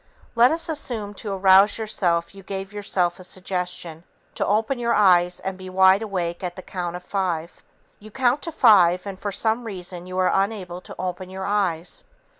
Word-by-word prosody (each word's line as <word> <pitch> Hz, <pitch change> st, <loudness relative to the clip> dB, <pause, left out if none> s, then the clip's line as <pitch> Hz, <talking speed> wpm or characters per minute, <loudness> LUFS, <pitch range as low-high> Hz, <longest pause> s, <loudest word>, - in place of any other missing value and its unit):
Let 235 Hz, +1 st, +6 dB
us 325 Hz, +1 st, -2 dB
assume 240 Hz, -10 st, -4 dB
to 205 Hz, +1 st, -6 dB
arouse 195 Hz, +1 st, +5 dB
yourself 180 Hz, -6 st, 0 dB
you 195 Hz, -, -12 dB
gave 195 Hz, +1 st, -6 dB
yourself 185 Hz, -4 st, -1 dB
a -, -, -10 dB
suggestion 180 Hz, -3 st, -4 dB, 0.3 s
to -, -, -1 dB
open 220 Hz, +6 st, 0 dB
your 235 Hz, -1 st, +1 dB
eyes 180 Hz, -3 st, +4 dB
and 190 Hz, 0 st, -5 dB
be 185 Hz, 0 st, -8 dB
wide 190 Hz, +2 st, +5 dB
awake 180 Hz, -5 st, -3 dB
at 175 Hz, -1 st, -3 dB
the 185 Hz, -, -9 dB
count 175 Hz, -2 st, -4 dB
of 180 Hz, -, -7 dB
five. 180 Hz, -5 st, -3 dB, 0.4 s
You 215 Hz, -, -12 dB
count 255 Hz, +4 st, +1 dB
to 330 Hz, -, -4 dB
five 185 Hz, -, +5 dB
and 195 Hz, -2 st, -7 dB
for 205 Hz, -, -3 dB
some 220 Hz, +4 st, 0 dB
reason 180 Hz, -4 st, -7 dB
you 185 Hz, 0 st, -6 dB
are 185 Hz, 0 st, +3 dB
unable 195 Hz, -3 st, -1 dB
to -, -, -11 dB
open 185 Hz, 0 st, -4 dB
your 190 Hz, 0 st, -6 dB
eyes. 185 Hz, -5 st, -1 dB
190 Hz, 190 wpm, -23 LUFS, 180-210 Hz, 0.4 s, Let